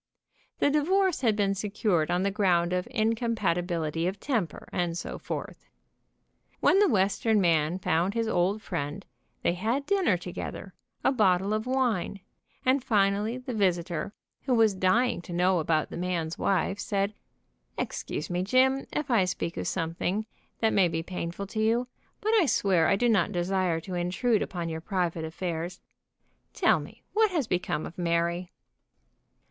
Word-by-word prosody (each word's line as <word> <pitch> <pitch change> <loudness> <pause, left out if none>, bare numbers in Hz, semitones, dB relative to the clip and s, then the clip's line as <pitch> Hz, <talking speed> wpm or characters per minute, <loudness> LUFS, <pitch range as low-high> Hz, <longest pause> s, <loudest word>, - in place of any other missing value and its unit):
The 285 - +2
di 300 - +3
vorce 375 +2 +2
had 225 -5 +3
been 200 -2 +1
secured 195 -5 0
on 180 +1 +1
the 200 - +1
ground 180 -3 +2
of 180 +3 -1
incompati 225 -6 0
bility 165 -2 -2
of 195 +1 -7
temper, 220 - -2
and 175 -1 -1
so - - -5
forth. - - -6 0.9
When 385 - +4
the 415 - +5
Western 205 0 +2
man 165 -2 +2
found 180 +2 0
his 230 -1 0
old 200 +1 +1
friend, 145 +7 -4 0.4
they - - +2
had 230 +10 -1
dinner 375 - +2
together, 180 +1 -7 0.3
a - - +4
bottle 195 -4 +2
of 215 +2 -2
wine, 245 -7 0 0.4
and 260 0 +3
finally 210 0 +1
the 255 0 -6
visitor, 180 -3 0 0.3
who 260 -3 +2
was 220 -3 +4
dying 190 +5 +2
to 175 - -8
know 180 +1 +3
about 155 -1 0
the - - -5
man's 175 -2 -2
wife, 195 +1 0
said: 200 -2 -1 0.6
''Excuse 150 - -3
me, 175 0 0
Jim, 260 +7 +2
if 295 -3 -2
I 210 -6 +4
speak 170 -1 -3
of - - -3
something 180 +4 -1 0.4
that 220 -1 +3
may 190 -3 +4
be 165 -1 -2
painful 180 +2 -5
to 215 +3 -5
you, 230 +3 +2 0.3
but 435 +2 +1
I 340 - +3
swear 185 -9 +3
I 200 - +4
do 240 +5 +1
not 210 -4 +3
desire 180 -2 0
to 185 +3 -7
in 175 0 -1
trude 225 +3 +1
upon 175 -2 -3
your 160 -1 -4
private 175 -3 -1
affairs. 170 +1 -4 0.8
Tell - - +4
me - - -11
what 435 0 +4
has 330 -8 0
become 180 -5 -1
of 170 - -9
Mary." 170 +1 0
195 Hz, 165 wpm, -28 LUFS, 175-225 Hz, 0.9 s, the